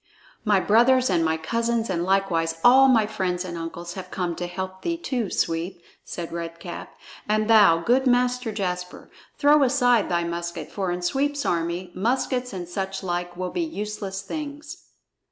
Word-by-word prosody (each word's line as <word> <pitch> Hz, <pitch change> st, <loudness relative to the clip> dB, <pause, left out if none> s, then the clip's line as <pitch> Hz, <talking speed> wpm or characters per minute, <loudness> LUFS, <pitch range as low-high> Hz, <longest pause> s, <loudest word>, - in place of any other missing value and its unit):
"My 210 Hz, -3 st, +3 dB
brothers 240 Hz, +4 st, +4 dB
and 170 Hz, -2 st, +2 dB
my 160 Hz, 0 st, +1 dB
cousins 230 Hz, +6 st, -1 dB
and 175 Hz, -3 st, -1 dB
likewise 175 Hz, -4 st, +1 dB
all 265 Hz, +2 st, +7 dB
my 230 Hz, -5 st, +4 dB
friends 185 Hz, -3 st, -2 dB
and 175 Hz, -2 st, -6 dB
uncles 170 Hz, +1 st, -6 dB
have 185 Hz, -1 st, -8 dB
come 180 Hz, -3 st, -2 dB
to 175 Hz, -, -3 dB
help 190 Hz, +1 st, -6 dB
thee 335 Hz, -1 st, -2 dB
too, 250 Hz, -, -2 dB
Sweep," 170 Hz, +2 st, -2 dB, 0.2 s
said 170 Hz, -1 st, -6 dB
Red 170 Hz, 0 st, -5 dB
Cap. 175 Hz, 0 st, -8 dB, 0.3 s
"And 215 Hz, 0 st, +2 dB
thou, 205 Hz, -7 st, +6 dB
good 260 Hz, +5 st, +3 dB
Master 250 Hz, -1 st, +2 dB
Jasper, 180 Hz, -3 st, -4 dB, 0.3 s
throw 295 Hz, +1 st, +5 dB
aside 245 Hz, -4 st, +3 dB
thy 170 Hz, -1 st, +1 dB
musket, 170 Hz, -2 st, -5 dB
for 195 Hz, -3 st, -2 dB
in 175 Hz, 0 st, -3 dB
Sweep's 285 Hz, +9 st, 0 dB
army, 170 Hz, +1 st, -1 dB
muskets 250 Hz, +4 st, -1 dB
and 180 Hz, -3 st, -6 dB
such 190 Hz, +2 st, -4 dB
like 175 Hz, -1 st, -3 dB
will 185 Hz, 0 st, -3 dB
be 350 Hz, -, -2 dB
useless 210 Hz, -, -4 dB
things." 295 Hz, +6 st, -7 dB
195 Hz, 170 wpm, -24 LUFS, 175-245 Hz, 0.3 s, all